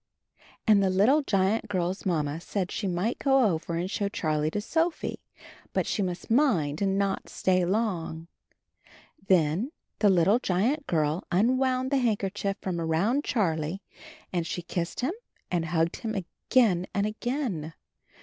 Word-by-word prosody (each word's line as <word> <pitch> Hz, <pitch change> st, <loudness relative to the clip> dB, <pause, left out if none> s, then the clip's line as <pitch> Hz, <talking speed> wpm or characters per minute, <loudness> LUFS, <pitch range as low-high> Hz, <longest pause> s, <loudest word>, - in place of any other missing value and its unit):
Ajid 210 Hz, -2 st, +6 dB
the 195 Hz, -, +3 dB
little 210 Hz, +11 st, +4 dB
giant 210 Hz, -2 st, +1 dB
girl's 185 Hz, 0 st, -2 dB
mamma 155 Hz, -2 st, -1 dB
said 185 Hz, 0 st, -3 dB
she 205 Hz, -, -2 dB
might 185 Hz, +6 st, -1 dB
go 270 Hz, -1 st, +4 dB
over 170 Hz, -3 st, -1 dB
and 175 Hz, +3 st, -2 dB
show 200 Hz, -2 st, -1 dB
Charlie 155 Hz, -5 st, 0 dB
to 205 Hz, -, -2 dB
Sophie, 325 Hz, +9 st, -1 dB, 0.5 s
but -, -, +1 dB
she 210 Hz, -, -1 dB
must 180 Hz, +2 st, -4 dB
mind 185 Hz, -, +2 dB
and 195 Hz, -1 st, +1 dB
not 200 Hz, -1 st, -1 dB
stay 185 Hz, -1 st, +1 dB
long. 175 Hz, -5 st, -1 dB, 1.0 s
Then 180 Hz, -, +2 dB, 0.3 s
the 210 Hz, -, +5 dB
little 190 Hz, +5 st, +4 dB
giant 250 Hz, -, 0 dB
girl 155 Hz, +1 st, 0 dB
unwound 255 Hz, +6 st, +2 dB
the 280 Hz, -, +3 dB
handkerchief 205 Hz, -4 st, -1 dB
from 175 Hz, -3 st, -2 dB
around 185 Hz, -, +1 dB
Charlie 170 Hz, -, -1 dB, 0.5 s
and 170 Hz, -2 st, -1 dB
she 175 Hz, -, -4 dB
kissed 170 Hz, +4 st, -3 dB
him 270 Hz, +8 st, 0 dB, 0.4 s
and 170 Hz, -2 st, 0 dB
hugged 165 Hz, 0 st, 0 dB
him 220 Hz, -2 st, -4 dB
again 190 Hz, 0 st, +1 dB
and 200 Hz, 0 st, +2 dB
again. 215 Hz, -, -3 dB
195 Hz, 150 wpm, -27 LUFS, 170-225 Hz, 1.0 s, Ajid